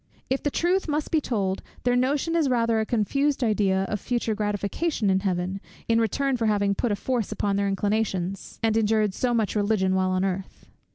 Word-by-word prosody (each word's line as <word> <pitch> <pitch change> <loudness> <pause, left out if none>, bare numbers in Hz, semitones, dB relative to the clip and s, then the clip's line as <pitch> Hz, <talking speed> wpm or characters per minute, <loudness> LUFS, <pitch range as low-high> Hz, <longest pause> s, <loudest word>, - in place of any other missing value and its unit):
If 265 - +1
the 290 - 0
truth 355 +6 +1
must 300 0 -2
be 315 -2 +3
told, 195 -8 -1 0.2
their 245 0 +2
notion 280 +6 +1
is 315 -5 +2
rather 230 -2 +2
a 220 - -1
confused 275 +5 +1
idea 200 -4 +2
of 210 - -2
future 235 +1 -1
gratification 210 - -1
in 190 - +3
Heaven, 190 0 -2 0.3
in 230 0 +3
return 265 +4 0
for 230 -2 0
having 200 -1 +2
put 225 +3 -1
a - - +2
force 235 0 -2
upon 205 -1 0
their 200 0 +1
inclinations, 195 -2 -2
and 220 -1 +2
endured 215 -2 +2
so 250 +4 0
much 220 -2 0
religion 205 -2 +1
while 185 0 +1
on 185 +1 +1
earth. 190 0 -4
215 Hz, 195 wpm, -25 LUFS, 195-250 Hz, 0.3 s, be